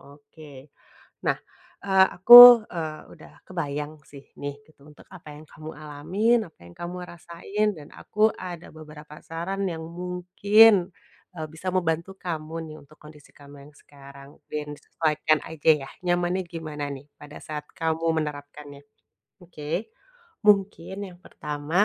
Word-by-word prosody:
oke. 145 -1 -16 0.5
Nah, - - +2 0.5
eee, 190 -1 +5
aku, 240 +3 +11
eee, 160 -3 -6
udah - - -16
kebayang 150 -4 -5 0.2
sih 140 -1 -13 0.2
nih 145 0 -5
gitu 155 -3 -26
untuk 150 - -18
apa 175 -5 -13
yang 150 - -13
kamu 155 +1 -10
alamin, 155 +10 0
apa - - -41
yang 85 - -14
kamu 175 +1 -7
rasain, 175 +5 -4
dan 145 -2 -12
aku 215 +1 0
ada 175 -2 -8
beberapa 150 -1 -13
saran 180 +5 -4
yang 160 -2 -6
mungkin, 180 +4 +3 0.5
eee, 155 -1 -6
bisa 185 +3 -5
membantu 170 +1 -1
kamu 160 -3 -6 0.2
nih - - -11
untuk 150 +2 -21
kondisi 150 -1 -16
kamu 145 0 -15
yang - - -23
sekarang, 140 -1 -15 0.2
dan 150 -1 -5
disesuaikan 155 0 -1
aja 160 -1 -2 0.2
ya - - -12 0.2
nyamannya 175 +1 0
gimana 155 -4 -6
nih, 135 0 -11 0.2
pada 150 0 -11
saat 150 -1 -7
kamu 160 0 -2 0.2
menerapkannya. 145 -1 -9 0.6
Oke, 170 - -6 0.5
mungkin 195 -3 +2
yang 175 -1 -15
pertama, 150 +6 -2
160 Hz, 140 wpm, -24 LUFS, 150-180 Hz, 0.6 s, aku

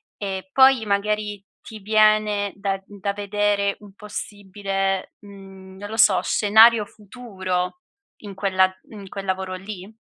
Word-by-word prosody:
e 195 +2 -5
poi 265 -3 +5
magari 210 0 -1 0.2
ti 220 -1 -11
viene 215 -1 +2
da 195 -1 -3
da 200 0 -4
vedere 205 0 0
un 200 -2 -14
possibile, 195 -2 -4
mhmm, 195 -2 -14
non 205 +1 -8
lo 220 - -6
so, 210 -4 +5
scenario 220 +1 +5
futuro 195 - -5 0.4
in 200 -1 -8
quella 190 -1 +1 0.2
in 200 -3 -11
quel 195 -1 -7
lavoro 190 0 -3
lì? 195 +2 -9
200 Hz, 130 wpm, -22 LUFS, 195-210 Hz, 0.4 s, poi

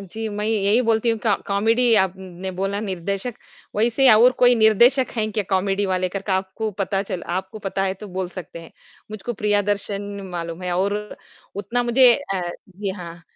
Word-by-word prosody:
जी, 220 +4 -6
मैं 210 0 -4
यही 215 +1 +2
बोलती 230 0 +2
हूँ 225 - -1
कॉ 215 -3 +3
कॉमेडी 225 +4 +3
आपने 190 0 -5
बोला 195 +2 -2
निर्देशक, 200 +3 -3 0.4
वैसे 240 +4 +4
और 235 +4 +6
कोई 245 0 +7
निर्देशक 235 +4 +4
है 215 -1 +1
क्या 210 0 -1
कॉमेडी 195 +1 +1
वाले 185 -1 0
करके 195 +1 -4
आपको 190 +3 -2
पता 195 0 0
चल 185 -3 -5
आपको 190 +4 -4
पता 195 -1 -3
है 190 0 -1
तो 205 +2 -10
बोल 185 0 -3
सकते 175 -2 -9
हैं। 165 - -14 0.4
मुझको 215 +3 -5
प्रियदर्शन 205 -1 0 0.3
मालूम 170 0 -5
है 180 -1 -2
और 200 +2 +1 0.6
उतना 210 +5 -1
मुझे 240 +1 +6 0.2
अ, 175 -2 -2 0.2
जी 195 +1 -5
हाँ। 170 -3 -9
200 Hz, 175 wpm, -22 LUFS, 190-220 Hz, 0.6 s, कोई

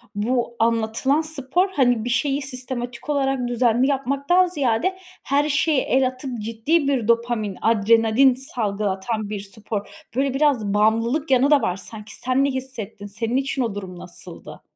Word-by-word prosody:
bu 235 +3 -1
anlatılan 230 +6 +1
spor, 315 +4 0
hani, 245 -9 +2
bir 245 - -2
şeyi 275 +3 0
sistematik 255 -1 -5
olarak 270 -3 0
düzenli 245 +1 +2
yapmaktan 280 +6 +2
ziyade 310 +3 0 0.3
her 290 +2 +1
şeye 295 -1 +2
el 260 0 +2
atıp 255 -1 -6
ciddi 230 +8 0
bir 250 -6 0
dopamin, 230 -4 0
adrenalin 225 +4 +4
salgılatan 215 -3 -2
bir 210 -1 -4
spor. 205 +1 -5 0.3
Böyle, 270 0 +1
biraz 270 -8 +1
bağımlılık 230 +8 +1
yanı, 265 +3 +4
da 290 -2 +6
var. 180 - 0
Sanki 210 +2 -7
sen 255 +2 +1
ne - - +1
hissettin? 250 -6 -6
Senin 225 +5 -2
için 275 -1 -1
o 225 -4 -2
durum 185 -3 -7
nasıldı? 175 -3 -10
245 Hz, 150 wpm, -22 LUFS, 220-275 Hz, 0.3 s, da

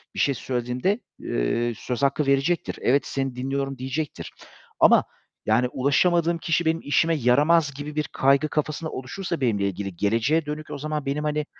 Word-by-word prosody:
bir - - -4
şey 140 - +3
söylediğimde, 125 - -1 0.2
eee, 115 - -1
söz 125 +2 -4
hakkı 140 +1 +2
verecektir. 140 +6 +1
"Evet, 140 +4 +2
seni 135 -2 -3
dinliyorum." 135 +1 -3
diyecektir. 135 +4 -4 0.5
Ama, - - +6 0.4
yani 115 +3 +3
"Ulaşamadığım 165 +6 +2
kişi 165 0 0
benim 165 +1 +1
işime 160 +3 +2
yaramaz." 145 +3 +3
gibi 145 +2 -7
bir 150 - +1
kaygı 140 +3 +3
kafasında 155 +1 -2
oluşursa 165 +5 -5
benimle 105 -5 +1
ilgili 100 -1 -5
geleceğe 115 - +1
dönük, 150 +1 -6
o - - -4
zaman 150 0 -3
benim 145 +2 -2
hani 150 0 -1
140 Hz, 160 wpm, -24 LUFS, 125-155 Hz, 0.5 s, Ama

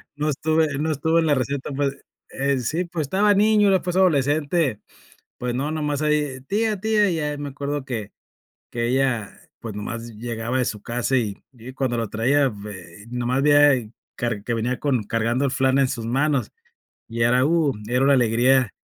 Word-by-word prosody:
no 150 +1 -1
estuve 155 0 +1
no 155 +3 -1
estuve 160 +3 +1
en - - 0
la 145 - +3
receta, 135 +2 -2
puede 140 0 -2 0.3
eh, 140 0 0
sí, 160 +9 -1
pues, 170 -3 -3
estaba 200 +8 +3
niño, 210 0 +4
era, 190 -2 +3
pues, 180 0 -3
adolescente. 145 - +2 0.6
Pues, 125 -1 -3
no, 135 +4 -2
nomás 150 -2 -2
ahí, 150 -3 0
¡tía, 215 0 0
tía! 210 -1 +2
Y 170 - -1
ya 150 -2 -2
me 145 0 -5
acuerdo 145 +1 -4
que 110 -6 -5 0.6
que 120 0 -1
ella, 125 -5 0 0.2
pues, 110 -3 -7
nomás 115 +3 -5
llegaba 115 +2 -3
de 125 - +1
su 105 -2 -4
casa, 125 +3 -1
y 105 -4 -2 0.2
y 125 +2 -11
cuando 130 -3 -1
la 115 -2 -1
traía 135 +7 +2
vei 100 -3 -10
nomás 125 +2 -1
veía 145 -6 +4 0.3
car 115 -4 -3
que 120 - -2
venía 115 +2 -1
con 130 -6 0
cargando 115 +5 0
el 130 - 0
flan 130 -1 +2
en 135 - +3
sus 120 -4 -4
manos, 135 0 0 0.6
y 115 +1 -2
era, 125 +2 +4
uh, 155 -2 +2 0.2
era 125 +2 +1
una 140 +1 +5
alegría 125 0 +3
135 Hz, 190 wpm, -23 LUFS, 120-150 Hz, 0.6 s, una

